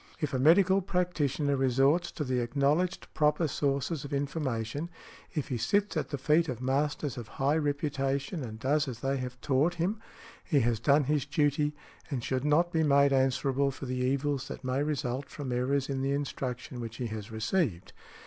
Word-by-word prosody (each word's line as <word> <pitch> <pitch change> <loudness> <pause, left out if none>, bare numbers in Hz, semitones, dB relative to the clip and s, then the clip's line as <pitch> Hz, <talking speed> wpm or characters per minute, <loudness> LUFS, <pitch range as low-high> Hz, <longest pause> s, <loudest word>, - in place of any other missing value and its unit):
If 150 - -2
a 130 - +1
medical 190 +7 +5
practitioner 160 -6 0
resorts 135 +6 +2
to 150 - -3
the 130 -2 0
acknowledged 145 +9 +1
proper 150 +2 +2
sources 140 +2 -1
of 140 - -8
information—if 145 +2 -4
he 125 -3 -2
sits 205 - +1
at 155 - -1
the 145 - -3
feet 150 +4 +2
of 125 -3 -3
masters 140 +1 -1
of 115 - -8
high 140 +3 +2
reputation 145 +1 -1
and 110 -3 -6
does 145 +5 +1
as 120 -3 -6
they 135 +1 0
have 125 -1 -5
taught 145 +5 +2
him—he 195 -2 -3
has 115 -1 +1
done 145 +4 +4
his 145 0 0
duty, 145 0 +1 0.3
and 130 -6 -3
should 130 +2 -1
not 170 +4 +3
be 160 - +2
made 140 -2 +4
answerable 135 +1 +2
for 135 0 -7
the 130 0 -3
evils 135 +1 0
that 140 - -8
may 130 +2 0
result 140 -3 -2
from 140 -4 -5
errors 130 +3 0
in 135 -1 -2
the 135 +1 0
instruction 130 -3 -4
which 115 -1 -6
he 125 - -3
has 110 -1 -5
received. 110 - -1
140 Hz, 175 wpm, -30 LUFS, 130-150 Hz, 0.3 s, medical